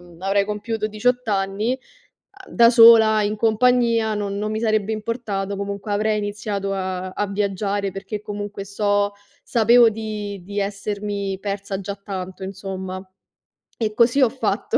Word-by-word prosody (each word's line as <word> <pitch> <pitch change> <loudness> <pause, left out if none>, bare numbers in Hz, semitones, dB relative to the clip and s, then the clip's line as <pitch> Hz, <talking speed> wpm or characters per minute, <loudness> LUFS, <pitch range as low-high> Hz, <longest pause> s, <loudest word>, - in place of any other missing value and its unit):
mhmm, 175 -1 -17
avrei 200 +1 +2
compiuto 215 +1 -3
18 245 +3 0
anni, 200 +5 0 0.5
a 385 -1 -15
da 235 -1 +6
sola, 225 -2 +7
in 205 +1 0
compagnia 230 0 +2
non 200 -1 -3
non 210 +1 -2
mi 220 - -2
sarebbe 215 -1 +1
importato, 210 -3 -3
comunque 200 +1 -5
avrei 215 +1 +1
iniziato 205 -1 -3
a 185 -1 -3
a 185 - -10
a 205 - 0
viaggiare, 200 0 -1
perché 205 +2 -6
comunque 205 -1 -6
so 205 0 0 0.3
sapevo 235 0 +5
di 210 -3 -5
di 200 +2 -3
essermi 200 -1 -3
persa 200 -1 -4
già 200 +1 -5
tanto, 190 -2 -7
insomma. 190 -1 -6 0.8
E 215 -2 -1
così 240 +5 +3
ho 250 - +5
fatto, 230 -2 -1
205 Hz, 150 wpm, -22 LUFS, 195-220 Hz, 0.8 s, sola